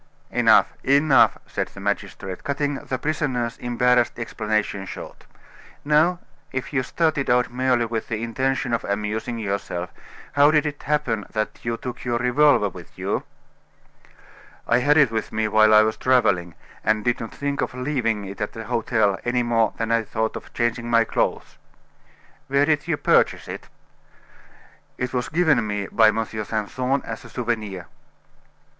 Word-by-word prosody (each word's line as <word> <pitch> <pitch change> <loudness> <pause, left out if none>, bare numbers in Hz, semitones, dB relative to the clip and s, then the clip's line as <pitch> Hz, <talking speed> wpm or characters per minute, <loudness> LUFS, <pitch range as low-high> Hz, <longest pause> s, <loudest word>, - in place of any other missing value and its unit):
"Enough - - +4
enough!" 140 -1 +4
said - - -3
the - - -13
magistrate, 100 -2 -4
cutting 145 0 -1
the 135 -1 -4
prisoner's 130 -5 -1
embarrassed 125 0 +2
explanation 110 -4 -2
short. - - -9 0.6
"Now, 155 +4 +3 0.3
if 130 +2 -4
you 130 - +2
started 140 +2 0
out 125 -1 +2
merely 125 -1 +2
with 115 -1 -3
the 115 -1 -3
intention 130 +1 -1
of 115 - 0
amusing 105 +4 -2
yourself, 100 -4 -3 0.4
how 145 +1 +6
did 155 0 +3
it 145 -1 -4
happen 135 -8 -1
that 110 0 -2
you 115 0 -2
took 125 0 -7
your 120 -1 0
revolver 125 -1 +4
with 90 -3 -11
you?" - - -2 1.4
"I 120 - +4
had 145 +4 +3
it 140 -6 +5
with 110 - -3
me 110 0 0
while 110 0 +5
I 110 0 +7
was 110 0 -1
traveling, 95 -10 +2 0.3
and 110 0 +1
did 120 -1 +1
not 115 - -6
think 140 0 -3
of - - -3
leaving 125 -6 -1
it 100 +2 -8
at 105 - -3
the 115 - -7
hotel 110 -4 +1
any 120 0 +1
more 115 -2 +1
than 115 0 -2
I 115 0 +3
thought 110 0 -2
of - - -9
changing 120 0 -1
my 115 -1 +5
clothes." - - -2 0.9
"Where 140 +1 +3
did 150 -2 +1
you - - 0
purchase - - +2
it?" - - -8 1.3
"It 125 0 -3
was 125 -1 -1
given 150 -9 +2
me 105 -1 -2
by 110 -1 +5
M. 110 +1 +1
Simpson 110 +5 -2
as 115 +2 -6
a 120 - -12
souvenir." 110 -6 -3
120 Hz, 160 wpm, -23 LUFS, 110-130 Hz, 1.4 s, I